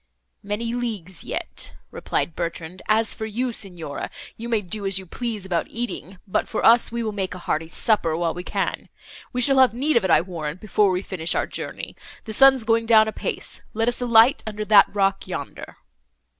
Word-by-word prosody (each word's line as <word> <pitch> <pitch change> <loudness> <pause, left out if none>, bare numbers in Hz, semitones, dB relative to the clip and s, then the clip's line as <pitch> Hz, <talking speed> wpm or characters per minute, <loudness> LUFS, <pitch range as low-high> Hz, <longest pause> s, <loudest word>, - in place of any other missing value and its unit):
"Many 220 +3 -3
leagues 210 -8 -5
yet," - - -6 0.2
replied 165 - -2
Bertrand. 170 +1 -5
"As 220 +1 +3
for 220 - -5
you, 240 +3 -2
Signora, 175 -9 -5 0.3
you 235 +1 -7
may 225 -3 +1
do 205 +2 -4
as 195 -1 +1
you 190 - -6
please 220 0 -5
about 175 -3 -1
eating, 230 -5 -5
but 185 - -1
for - - -2
us, 235 0 +6
we 235 0 -3
will 220 - -2
make 190 -3 -4
a - - -7
hearty 165 -2 -2
supper, 165 -3 +1
while 170 -1 0
we 180 - -7
can. - - -3 0.4
We 250 - -2
shall 270 +2 +4
have 255 -4 +5
need 290 +5 0
of 230 - +2
it, 190 - 0
I - - +5
warrant, 170 -2 -6
before 210 0 +2
we 185 +1 -1
finish 170 -4 -2
our - - +1
journey. - - -7 0.3
The 220 - -5
sun's 270 +1 +7
going 225 0 +1
down 220 -1 +6
apace; 220 - -2
let 225 +1 0
us 245 +1 0
alight 235 +3 +5
under 215 0 -4
that 205 -2 +7
rock, 195 -1 0
yonder." - - -7
210 Hz, 200 wpm, -23 LUFS, 185-230 Hz, 0.4 s, sun's